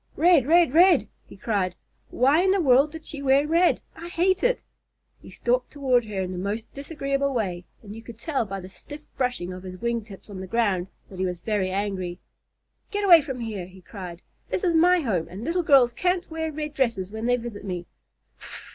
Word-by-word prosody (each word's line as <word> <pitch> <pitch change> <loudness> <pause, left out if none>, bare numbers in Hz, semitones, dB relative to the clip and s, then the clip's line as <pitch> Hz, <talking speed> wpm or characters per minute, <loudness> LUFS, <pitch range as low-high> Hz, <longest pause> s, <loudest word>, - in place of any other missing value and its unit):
"Red 325 -6 +5
red 335 -3 +5
red!" 345 -1 +5 0.2
he - - -13
cried. 195 -4 -1 0.3
"Why 275 +7 +3
in 380 - +2
the 390 +1 +3
world 280 -1 +4
did 320 0 -10
she 290 - -6
wear 275 +1 +3
red? 335 +3 +3
I 335 +1 -8
hate 365 +2 +1
it!" - - +1 0.6
He - - -13
stalked 250 +1 -1
toward 255 -5 +1
her 200 -3 -3
in 185 - -4
his 180 -1 -4
most 210 +4 -4
disagreeable 280 -1 -2
way, 180 -6 -2 0.2
and 210 0 -9
you 225 - -9
could 230 -1 -11
tell 275 +1 -1
by 195 -2 -6
the 185 - -9
stiff 290 +10 -11
brushing 245 -9 -2
of 180 - -8
his 185 0 -8
wing 235 -1 -1
tips 200 -3 -13
on 200 -3 -8
the 190 - -6
ground 195 -4 0 0.2
that 185 - -9
he 190 - +1
was 180 -1 -4
very 205 -1 -1
angry. 190 -2 -3 0.7
"Get 410 0 -2
away 340 -4 +8
from 265 -3 -6
here!" 210 -6 -5
he 190 +1 -15
cried. 180 -2 -9 0.3
"This - - -2
is 350 -3 +2
my 350 +2 +5
home 185 - -1
and 190 +5 -8
little 335 +6 0
girls 270 -6 +5
can't 360 +6 -1
wear 320 0 -3
red 300 0 -5
dresses 230 -9 -1
when 220 +2 -4
they 245 0 +3
visit 230 -4 -7
me. 180 -3 -4
240 Hz, 210 wpm, -25 LUFS, 195-310 Hz, 0.7 s, away